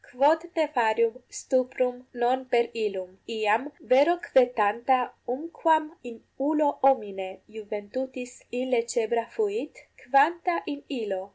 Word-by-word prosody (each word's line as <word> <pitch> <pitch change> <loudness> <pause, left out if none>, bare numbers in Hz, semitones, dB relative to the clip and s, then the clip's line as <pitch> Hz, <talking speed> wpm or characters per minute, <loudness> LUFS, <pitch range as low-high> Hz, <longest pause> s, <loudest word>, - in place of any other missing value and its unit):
quod 295 +6 +3
nefarium 235 -7 +2
stuprum 255 -1 -1
non 245 +2 +1
per 240 -2 +2
illum? 195 -4 -4
Iam 220 +5 0 0.2
vero 285 +7 +6
quae 265 -7 +4
tanta 235 +5 +2
umquam 315 +3 +1 0.2
in 230 -1 -13 0.2
ullo 305 -1 +3
homine 205 -8 +2 0.3
iuventutis 245 +4 -6
inlecebra 235 -2 0
8 - - -25
fuit, 430 0 -2 0.3
quanta 330 +7 +3
in 285 -2 -5
illo? 215 -8 -3
250 Hz, 110 wpm, -27 LUFS, 225-285 Hz, 0.3 s, vero